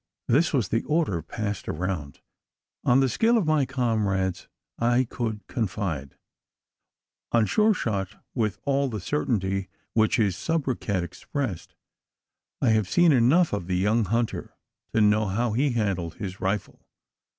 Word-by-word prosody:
This 150 Hz, +8 st, +3 dB
was 125 Hz, -, +1 dB
the 115 Hz, -, +1 dB
order 150 Hz, -, +1 dB
passed 105 Hz, +3 st, -4 dB
around. 80 Hz, -4 st, -3 dB, 0.6 s
On 125 Hz, +2 st, +4 dB
the 135 Hz, -, +3 dB
skill 230 Hz, -, +3 dB
of 210 Hz, -, +1 dB
my 155 Hz, -4 st, +2 dB
comrades 105 Hz, -8 st, 0 dB, 0.3 s
I 120 Hz, +2 st, +3 dB
could 115 Hz, -3 st, -4 dB
confide 95 Hz, -, -3 dB, 1.1 s
on 115 Hz, -2 st, +4 dB
Sure 215 Hz, -, +3 dB
shot 100 Hz, -, -2 dB, 0.2 s
with 110 Hz, -5 st, -1 dB
all 140 Hz, -1 st, +1 dB
the 110 Hz, -3 st, -4 dB
certainty 95 Hz, -5 st, -1 dB, 0.2 s
which 110 Hz, -1 st, +3 dB
his 100 Hz, -6 st, +2 dB
soubriquet 130 Hz, -, -1 dB
expressed; 95 Hz, -, -5 dB, 0.9 s
and 115 Hz, -, +4 dB
I -, -, +5 dB
had 110 Hz, -3 st, +2 dB
seen 175 Hz, -, +4 dB
enough 140 Hz, +6 st, +4 dB
of 100 Hz, -4 st, -2 dB
the 90 Hz, -1 st, 0 dB
young 105 Hz, +4 st, +2 dB
hunter, 115 Hz, +4 st, -2 dB, 0.4 s
to 110 Hz, -, +4 dB
know 105 Hz, 0 st, +4 dB
how 115 Hz, +5 st, 0 dB
he 135 Hz, +3 st, +1 dB
handled 95 Hz, -7 st, -1 dB
his 95 Hz, -2 st, -6 dB
rifle. 95 Hz, +1 st, -2 dB
110 Hz, 145 wpm, -26 LUFS, 95-130 Hz, 1.1 s, I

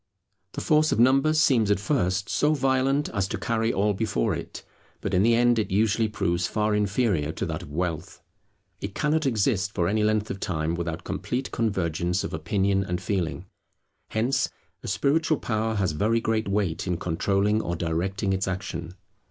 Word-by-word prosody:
The -, -, -4 dB
force 155 Hz, 0 st, +3 dB
of -, -, +1 dB
numbers 135 Hz, +6 st, +4 dB
seems 120 Hz, -9 st, +3 dB
at 100 Hz, -, +3 dB
first 100 Hz, -4 st, 0 dB
so 150 Hz, +1 st, +2 dB
violent 135 Hz, +1 st, +1 dB
as 100 Hz, -1 st, -1 dB
to -, -, -3 dB
carry 115 Hz, -1 st, 0 dB
all 105 Hz, 0 st, +1 dB
before 95 Hz, -, 0 dB
it; -, -, -7 dB, 0.4 s
but -, -, -4 dB
in 90 Hz, -, +4 dB
the 115 Hz, +3 st, +4 dB
end 120 Hz, 0 st, +3 dB
it 110 Hz, -, -1 dB
usually 110 Hz, +3 st, +2 dB
proves 85 Hz, -4 st, -1 dB
far 105 Hz, +2 st, 0 dB
inferior 100 Hz, -6 st, +1 dB
to -, -, -3 dB
that -, -, -4 dB
of -, -, -10 dB
wealth. 85 Hz, 0 st, -3 dB, 0.6 s
It 100 Hz, 0 st, -6 dB
cannot 155 Hz, 0 st, +1 dB
exist 105 Hz, -4 st, 0 dB
for 85 Hz, -2 st, +1 dB
any 105 Hz, +3 st, +1 dB
length 110 Hz, 0 st, +1 dB
of 100 Hz, -, -5 dB
time 80 Hz, -4 st, -1 dB
without 85 Hz, 0 st, -4 dB
complete 130 Hz, +2 st, -3 dB
convergence 90 Hz, -5 st, -1 dB
of -, -, -5 dB
opinion 95 Hz, +5 st, 0 dB
and 90 Hz, -2 st, -3 dB
feeling. 90 Hz, -2 st, -2 dB, 0.6 s
Hence, 130 Hz, +5 st, 0 dB, 0.3 s
a -, -, -8 dB
spiritual 145 Hz, +10 st, +1 dB
power 110 Hz, 0 st, -1 dB
has 95 Hz, -5 st, +1 dB
very 110 Hz, +9 st, +1 dB
great 110 Hz, -1 st, -1 dB
weight 100 Hz, -4 st, -1 dB
in 90 Hz, -2 st, 0 dB
controlling 100 Hz, +5 st, +1 dB
or 85 Hz, -, -3 dB
directing 95 Hz, +4 st, -1 dB
its 95 Hz, 0 st, -1 dB
action. 90 Hz, -2 st, -4 dB
100 Hz, 175 wpm, -26 LUFS, 90-115 Hz, 0.6 s, numbers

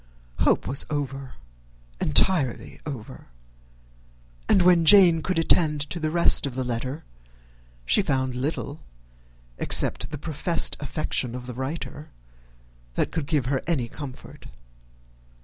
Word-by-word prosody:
Hope -, -, +2 dB
was 135 Hz, +2 st, +1 dB
over, 135 Hz, -3 st, -5 dB, 0.6 s
entirely 135 Hz, -, +1 dB
over; 110 Hz, -, -8 dB, 1.2 s
and 185 Hz, -, +4 dB
when 175 Hz, -2 st, +5 dB
Jane 175 Hz, -2 st, +7 dB
could 185 Hz, +2 st, -2 dB
attend 160 Hz, -2 st, +2 dB
to 175 Hz, -, -1 dB
the 155 Hz, -1 st, -1 dB
rest 170 Hz, -3 st, +5 dB
of 130 Hz, -, -8 dB
the 130 Hz, -, -2 dB
letter, 130 Hz, +5 st, -4 dB, 0.8 s
she -, -, +3 dB
found 130 Hz, -2 st, -1 dB
little, 145 Hz, +3 st, -4 dB, 0.8 s
except -, -, +1 dB
the 150 Hz, -, -6 dB
professed 160 Hz, +3 st, 0 dB
affection 135 Hz, -4 st, -3 dB
of 125 Hz, -1 st, -8 dB
the 125 Hz, -, -7 dB
writer, 145 Hz, +3 st, -6 dB, 0.9 s
that -, -, -1 dB
could 160 Hz, -4 st, -4 dB
give 145 Hz, -6 st, 0 dB
her 135 Hz, +1 st, -1 dB
any 140 Hz, -9 st, -1 dB
comfort. 135 Hz, 0 st, -10 dB
145 Hz, 125 wpm, -24 LUFS, 130-165 Hz, 1.2 s, Jane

